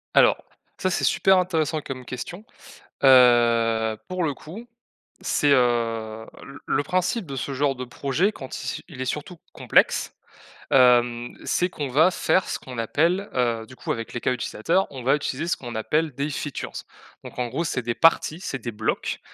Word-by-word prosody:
Alors, - - +5 0.3
ça, 185 - -1
c'est - - -1
super 190 -1 +4
intéressant 160 -4 0
comme 130 -3 -7
question, 175 - -7 0.6
heu, 115 -4 +5
pour 185 -1 -2
le 145 - -1
coup, 190 - -10 0.6
c'est, 145 -1 +2
heu, 115 -3 0 0.2
le 140 - -11
le 145 - +1
principe 185 +6 -1
de 140 - -6
ce 135 +2 -4
genre 140 0 +1
de 125 - -5
projet 140 - 0
quand 130 -10 -8
il - - -7
c - - -4
il 135 -6 -10
est 130 - -1
surtout 150 +6 -4 0.2
complexe, - - +2 0.6
hem, 120 -2 +4
c'est 180 +1 0
qu'on 150 -6 -4
va 155 +8 +4
faire 185 0 +1
ce - - -2
qu'on 130 -1 -10
appelle, 170 - 0
heu, 120 -3 0
du 130 - -13
coup, - - -7
avec 115 -1 -6
les 120 - -4
cas 130 - +1
utilisateurs, 175 +9 0
on 130 -3 -8
va 135 +4 +3
utiliser 150 +3 -3
ce - - +1
qu'on 120 -2 -8
appelle 150 +7 0
des 140 +3 -2
features. 145 0 -5 0.4
Donc, - - -11
en 125 -1 -1
gros, 145 +8 -2
c'est 130 -5 -2
des 120 0 -2
parties, 165 +3 +3
c'est 135 - -4
des 120 +1 -5
blocs, 110 +1 -2
135 Hz, 185 wpm, -24 LUFS, 120-165 Hz, 0.6 s, Alors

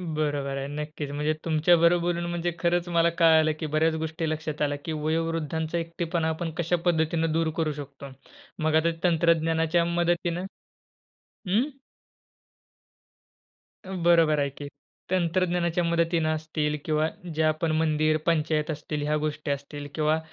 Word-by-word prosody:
बरोबर 145 -3 -1
आहे, 135 0 -3
नक्कीच 150 0 -5
म्हणजे 150 +2 0
तुमच्याबरोबर 170 +2 +4
बोलून 175 0 -1
म्हणजे 175 0 -1
खरंच 175 0 +1
मला 170 0 +3
कळालं, 160 -2 +5
की 160 - -3
बऱ्याच 160 +1 +3
गोष्टी 160 0 -3
लक्षात 155 -1 -4
आल्या 145 -1 +1
की 165 - -3
वयोवृद्धांचा 160 +1 -1
एकटेपणा 165 0 -2
आपण 160 +1 -3
कशा 170 +1 +1
पद्धतीने 165 -1 +2
दूर 165 0 +1
करू 160 -2 +1
शकतो. 140 0 -10 0.5
मग 155 0 +2
आता 160 +1 +3
तंत्रज्ञानाच्या 165 0 +2
मदतीनं 175 +1 0 1.0
हं. 220 +10 +2 2.2
उम्म, 185 -2 -5
बरोबर 165 -3 +4
आहे, 140 - +1
की 145 +1 -8 0.4
तंत्रज्ञानाच्या 175 -1 +1
मदतीने 170 -1 +1
असतील 155 -1 -1
किंवा 155 0 +1 0.3
जे 160 - +1
आपण 155 +1 +1
मंदिर, 155 -1 +2
पंचायत 155 -2 +1
असतील 150 0 -4
ह्या 150 +1 +1
गोष्टी 150 -1 -3
असतील 145 +1 -4
किंवा 155 0 +2
160 Hz, 135 wpm, -26 LUFS, 155-170 Hz, 2.2 s, कळालं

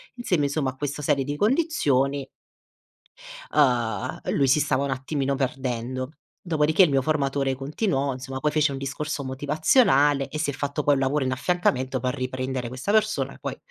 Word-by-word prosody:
insieme, 180 -11 0
insomma, 140 -2 -1
a - - -18
questa 145 +1 -4
serie 140 -2 +2
di 145 +2 -3
condizioni 145 - +1 1.3
uhm, 120 -8 +1 0.2
lui 140 -2 +3
si 140 +4 +4
stava 140 -2 +1
un 135 - -2
attimino 135 +1 -1
perdendo. 130 0 -3 0.3
Dopodiché 160 +1 +3
il 175 - +4
mio 135 -1 +2
formatore 140 -2 0
continuò, 140 - -1
insomma, 130 +1 -6
poi 150 +2 +1
fece 150 -1 +2
un 135 - -4
discorso 140 +1 -4
motivazionale 145 - +3
e 155 - -5
si 150 -2 0
è - - -2
fatto 145 +1 -2
poi 145 0 +4
un 135 - -1
lavoro 135 +1 +1
in 130 - -1
affiancamento 130 -3 0
per 125 +2 -2
riprendere 130 -1 -3
questa 130 +11 -3
persona, 215 0 +1
poi, - - -4
140 Hz, 170 wpm, -25 LUFS, 130-150 Hz, 1.3 s, si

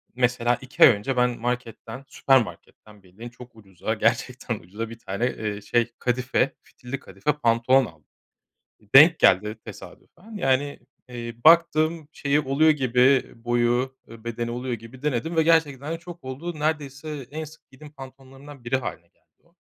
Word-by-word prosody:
mesela, 125 -1 +1
2 130 - +1
ay - - +11
önce 125 +3 -1
ben 125 -1 +1
marketten, 120 +1 -5
süpermarketten 110 -5 -1
bildiğin 100 +6 -11
çok 120 -1 -15
ucuza 95 -5 -5
gerçekten - - -1
ucuza 105 +6 -7
1 115 0 -11
tane, 100 +4 -3
eee, 105 -4 -4
şey 120 +2 0
kadife, 130 +2 0
fitilli 130 +2 -8
kadife 150 +1 -2
pantolon 125 -1 +3
aldım. - - -15 0.9
Denk 160 +4 +8
geldi 105 +4 +3
tesadüfen, 110 - -13
yani, 140 -3 0 0.3
eee, 120 -1 -7
baktım 160 -1 +4
şeyi 145 +1 +1
oluyor 145 +3 +3
gibi, 130 -2 +3
boyu, 120 +2 +1
e, 115 0 -13
bedeni 115 0 -4
oluyor 125 +1 -3
gibi 115 +4 -12
denedim 150 +3 -2
ve 160 - +5
gerçekten 155 -3 +1
de 165 - -6
çok 175 -2 -12
oldu. 155 +6 -6
Neredeyse 150 -2 -3
en 155 +1 -5
sık 155 +2 -15
giydiğim 145 +3 -14
pantolonlarımdan 135 0 -13
biri 120 +2 +1
hâline 130 - -6
geldi - - -42 0.2
o. - - -32
130 Hz, 150 wpm, -24 LUFS, 120-145 Hz, 0.9 s, ay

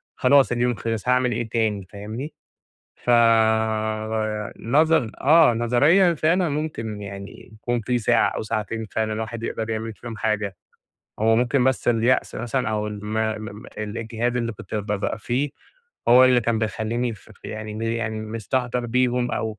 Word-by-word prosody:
خلاص 135 +1 +4
اليوم 120 0 +1
خلص 115 -1 -4
هاعمِل 125 0 +3
إيه 115 0 -2
تاني، 110 -4 0
فاهمني؟ 110 +9 -7 0.7
فب 110 -2 +3 0.5
نظن 145 0 +2
آه 155 -1 +6
نظريًا 145 +11 +4
فعلًا 165 +4 +2
ممكن 140 -8 -4
يعني 100 0 -9
يكون 120 +2 -2
في 125 +3 0
ساعة 110 - +3
أو - - -4
ساعتين 110 +1 -3
فعلًا 110 -1 -1
الواحد 110 +1 -4
يقدر 115 -1 -3
يعمل 110 0 -3
فيهم 115 +1 -8
حاجة، 105 -2 -1 0.6
هو 110 +1 +3
ممكن 125 +2 +2
بس 130 -2 +1
اليأس 120 +2 +2
مثلًا 120 0 -2
أو 105 -1 -1
الم 105 0 -6
م 110 -1 -1
م 110 0 -9 0.2
الإجهاد 115 +3 -2
اللي 115 -1 -1
كنت 110 - -10
ب 105 -1 -2
بأبقى 105 +1 -2
فيه، 130 +6 -1 0.6
هو 125 +2 +8
اللي 125 -1 +5
كان 115 -1 0
بيخليني 115 +2 -2
ف 105 - -18
ف 110 - -19
يعني 110 0 -6
م 110 - -5
يعني 115 -1 -2
مِستهتَر 120 +3 -2
بيهم 125 0 +1
أو 110 -1 -3
115 Hz, 160 wpm, -23 LUFS, 110-125 Hz, 0.7 s, هو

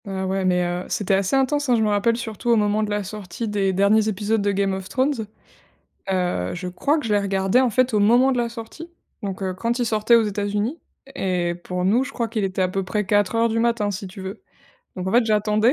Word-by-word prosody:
Ah, 190 -1 -3
ouais, 190 0 -1
mais 180 -1 +2
heu, 175 +1 -3
c'était 200 -1 0
assez 195 +5 +1
intense, 275 +1 +1
hein. 245 - +5
Je 220 - +2
me 215 - +2
rappelle, 210 +3 +2
surtout, 230 -1 -5
au 235 - +6
moment 210 0 +2
de 215 - -1
la 205 0 -1
sortie 205 +2 -6
des 200 -2 0
derniers 200 +3 +3
épisodes 215 +1 0
de 205 0 +1
Game 195 0 0
of 190 0 -6
Thrones. 260 -4 0 0.8
Heu, 180 - -1
je 180 +1 -5
crois 275 - 0
que 300 - -4
je 215 - 0
l'ai 205 - +4
regardé, 195 +2 +1
en 255 - +2
fait, 255 +2 +1
au 210 - +3
moment 240 +6 +4
de 250 - 0
la 235 -1 0
sortie, 235 +8 -9 0.3
donc 195 -1 -4
heu, 185 -1 -2
quand 230 +6 -2
il 245 - 0
sortait 220 +1 +3
aux 230 - +5
États-Unis 210 - -2 0.4
et 180 -2 -1
pour 180 +1 -4
nous, 225 +7 +3
je 270 - -7
crois 235 -4 -2
qu'il 220 -2 -2
était 190 0 -1
à - - +2
peu 195 +1 -2
près 210 +3 -2
04:00 205 +4 +2
du 225 +1 0
matin, 230 -3 +1
si 195 0 -5
tu 185 +2 -11
veux, 190 - -7 0.5
donc 185 0 -5
en - - -2
fait, 240 0 +4
j'attendais. 215 +2 +2
210 Hz, 250 wpm, -22 LUFS, 190-230 Hz, 0.8 s, au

